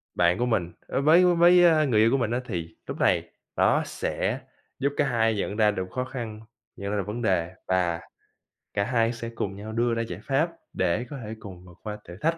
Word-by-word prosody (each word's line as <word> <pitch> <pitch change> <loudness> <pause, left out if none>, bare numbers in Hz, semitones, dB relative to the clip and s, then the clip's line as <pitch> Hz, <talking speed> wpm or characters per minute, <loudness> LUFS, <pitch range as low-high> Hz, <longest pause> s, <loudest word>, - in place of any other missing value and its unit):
bạn 85 0 +3
của 120 - +1
mình, 90 -8 0 0.2
à, - - -1
với 160 +6 +6
với, 175 0 +6
ờ, 160 -3 +5
người 110 -4 +3
yêu 115 +1 +5
của 135 - +3
mình 120 -3 -1
á 120 - +1
thì 85 -6 -5
lúc - - -5
này - - +2 0.2
nó - - +3
sẽ - - -2 0.4
giúp 140 +1 0
cả - - +3
hai 115 -3 +2
nhận 100 0 -2
ra 105 -1 +4
được 95 -2 -4
khó 125 - -2
khăn, 115 -5 -6 0.4
nhận 100 +1 -4
ra 105 - 0
được 100 - -2
vấn 115 +3 -4
đề, 90 -4 +1
và 90 -2 +1 0.7
cả 100 - +1
hai 115 0 +1
sẽ 115 0 -6
cùng 95 -1 -3
nhau 105 +2 -7
đưa 120 +1 +1
ra 115 - 0
giải 115 - -5
pháp 145 +5 +1 0.2
để 95 +6 0
có 145 - -6
thể 110 +1 -6
cùng 90 -4 -11
vượt 85 -1 -15
qua 105 -1 -5
thử 90 - -8
thách 165 +1 +1
110 Hz, 235 wpm, -26 LUFS, 95-130 Hz, 0.7 s, với